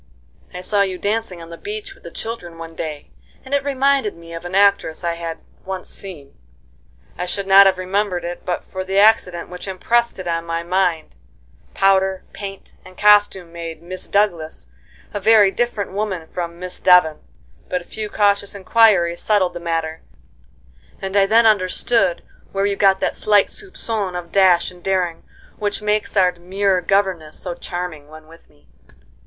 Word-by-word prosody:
"I 180 - -7
saw 200 +2 +1
you 190 -2 0
dancing 200 -4 -2
on 165 - -12
the 170 - -9
beach 420 -1 -6
with - - -23
the - - -8
children 225 -7 -6
one 165 0 -9
day, 155 -3 -6 0.3
and 265 - -7
it 280 -1 +2
reminded 275 -5 +1
me 165 0 -12
of 165 +1 -7
an 175 +2 -4
actress 200 -5 +3
I 170 -1 0
had 170 -1 -5 0.3
once 190 -1 -6
seen. 155 -8 -10 0.8
I 180 - -2
should 200 +2 -2
not 195 0 +8
have 190 -1 +2
remembered 185 -1 -1
it 175 0 -6
but 180 - -3
for 190 0 -6
the 190 +1 -2
accident 200 -5 +3
which 180 +2 -8
impressed 235 +5 0
it 185 -2 -7
on 165 -1 -1
my 165 0 -3
mind. 175 -2 0 0.6
Powder, 190 -1 +2
paint, 195 -1 -8
and 185 0 -15
costume 205 -4 +4
made 165 -1 -7
'Miss 185 +2 -7
Douglas' 170 - -1 0.4
a 205 - -2
very 210 -1 +5
different 230 -3 -2
woman 190 -5 -3
from 170 -1 -5
Miss 180 +1 -8
Devon, 180 -4 +5 0.5
but 180 - -1
a - - -15
few 215 -1 -6
cautious 200 -1 +1
inquiries 195 -4 +3
settled 195 -4 +2
the 175 - -6
matter, 165 -1 -3 1.0
and 195 0 -5
I 195 -1 +4
then 225 +3 +5
understood 195 -1 +2 0.3
where 195 0 0
you 200 0 0
got 195 -1 +3
that - - 0
slight 205 -2 +3
soupcon 225 - -4
of 175 -1 -6
dash 185 -3 +4
and 180 -1 -16
daring 180 -3 -1 0.4
which 205 0 -2
makes 210 0 0
our 185 -2 +5
demure 185 +2 0
governess 185 -5 0
so 180 - -4
charming 175 -4 -6
when 155 +1 -13
with 165 +1 -18
me." 75 - -28
185 Hz, 175 wpm, -20 LUFS, 170-205 Hz, 1.0 s, not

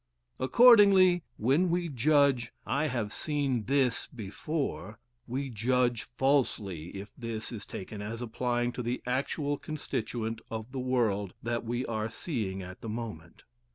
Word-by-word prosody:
Accordingly, 195 - +7 0.2
when 140 +11 +3
we 175 0 +1
judge 140 -3 +3
"I 150 +2 +1
have 115 -6 -2
seen 140 -7 -1
THIS 135 -3 +1
before," 115 - -4 0.3
we 130 +2 -3
judge 120 +1 +1
falsely 120 - 0
if 100 +2 -9
"this" 115 -2 -5
is 110 -5 -7
taken 100 +2 -7
as 110 +2 -5
applying 120 +1 -1
to 125 - -5
the 120 +1 -3
actual 140 +3 -1
constituent 115 -6 -3
of 110 +2 -5
the 135 - -4
world 115 -7 0
that 120 +1 -1
we 120 +2 -1
are 110 -1 -2
seeing 110 - -3
at 90 0 -10
the 115 - -5
moment. 105 -8 -6
120 Hz, 140 wpm, -30 LUFS, 110-140 Hz, 0.3 s, Accordingly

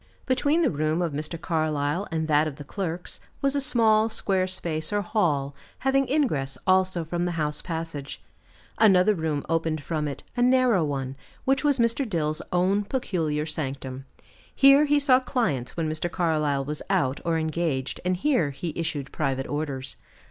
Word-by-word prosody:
Between 285 +6 +2
the 300 - +3
room 155 +1 0
of 170 -4 -1
Mr. 155 +3 -4
Carlyle 155 +1 -1
and 160 -1 -1
that 150 0 +3
of 150 - -5
the 145 - -9
clerks, 175 +2 -4 0.2
was 275 0 +1
a 280 - +1
small 225 -5 +3
square 190 -4 0
space 165 -3 -3
or 205 0 0
hall, 150 -9 0 0.2
having 270 0 +1
ingress 150 - 0
also 185 -2 +3
from 175 +2 -2
the 175 - -1
house 150 -2 -2
passage; 160 -5 -5 0.6
another 205 -1 +6
room 160 -5 -2
opened 160 -2 -1
from 155 -2 -2
it, 140 - -6
a 245 - 0
narrow 250 -6 +4
one, 135 -3 -3 0.3
which 270 +1 +2
was 290 -2 +3
Mr. 235 +3 +2
Dill's 155 -4 -1
own 185 +3 +2
peculiar 165 - -1
sanctum. 135 -4 -5 0.5
Here 275 +2 +7
he 295 0 +3
saw 275 -3 +5
clients 200 - -2
when 165 -2 0
Mr. 155 +2 -2
Carlyle 150 -6 0
was 150 +1 -4
out 130 0 +1
or 170 -1 +1
engaged, 160 -4 -2
and 180 0 0
here 220 - +2
he 150 +4 -5
issued 160 -5 -3
private 135 -3 -1
orders. 140 -3 -3
165 Hz, 170 wpm, -26 LUFS, 150-215 Hz, 0.6 s, Here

